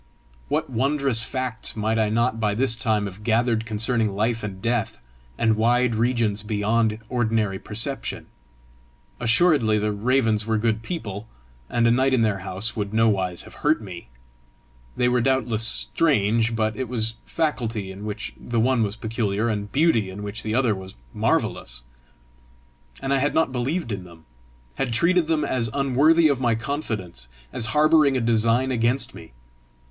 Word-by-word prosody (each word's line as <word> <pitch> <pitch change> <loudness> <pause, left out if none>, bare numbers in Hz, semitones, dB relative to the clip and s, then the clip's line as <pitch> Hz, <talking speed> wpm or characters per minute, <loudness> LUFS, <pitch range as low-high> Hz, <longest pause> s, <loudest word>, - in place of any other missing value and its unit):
What - - -1
wondrous 135 0 +1
facts 130 -2 -2
might 110 +1 0
I 110 -1 +2
not 115 +1 +1
by 105 -2 0
this 120 0 +2
time 110 -2 0
have 100 +1 -8
gathered 115 0 +1
concerning 110 0 0
life 115 +3 0
and 100 -3 -6
death, 115 0 -1 0.4
and 110 -1 +2
wide 120 +2 +2
regions 115 -2 0
beyond 110 +1 0
ordinary 110 -5 0
perception! 115 +6 -2 0.9
Assuredly 120 -2 +3
the 105 0 0
Ravens 110 0 +1
were 110 -1 +1
good 110 0 0
people, 110 - -5 0.4
and 120 0 +1
a 115 - +5
night 130 +2 +3
in 115 - +2
their 105 -3 0
house 95 +3 -3
would 105 -1 -3
nowise 95 -6 +1
have - - -13
hurt 150 +2 +3
me! 95 - -9 0.9
They 125 - +2
were 125 0 +2
doubtless 120 -3 +1
strange, 115 -8 +1
but 110 -1 0
it 130 0 -4
was 115 -2 -1
faculty 115 -10 -2
in 95 +2 -9
which 105 +1 -5
the 120 -1 -3
one 125 +1 +2
was 105 -1 -1
peculiar, 110 -1 -1
and 105 -2 -3
beauty 135 - +2
in 100 +2 -7
which 105 +2 -5
the 110 0 -2
other 125 -4 +3
was 95 -1 -8 0.2
marvellous! - - -1 1.2
And 135 - 0
I 135 - +2
had 145 +2 0
not 160 -5 +2
believed 130 +3 -2
in 95 -2 -4
them! 85 -2 -15 0.5
had 125 -3 -1
treated 170 +5 +3
them 155 -2 +1
as 115 -3 -1
unworthy 145 +4 +4
of 140 -3 0
my 120 -2 +2
confidence, 110 - -4 0.3
as 110 - -1
harbouring 155 -3 +5
a - - +1
design 115 +2 +2
against 120 +2 0
me! - - -12
115 Hz, 165 wpm, -23 LUFS, 105-130 Hz, 1.2 s, a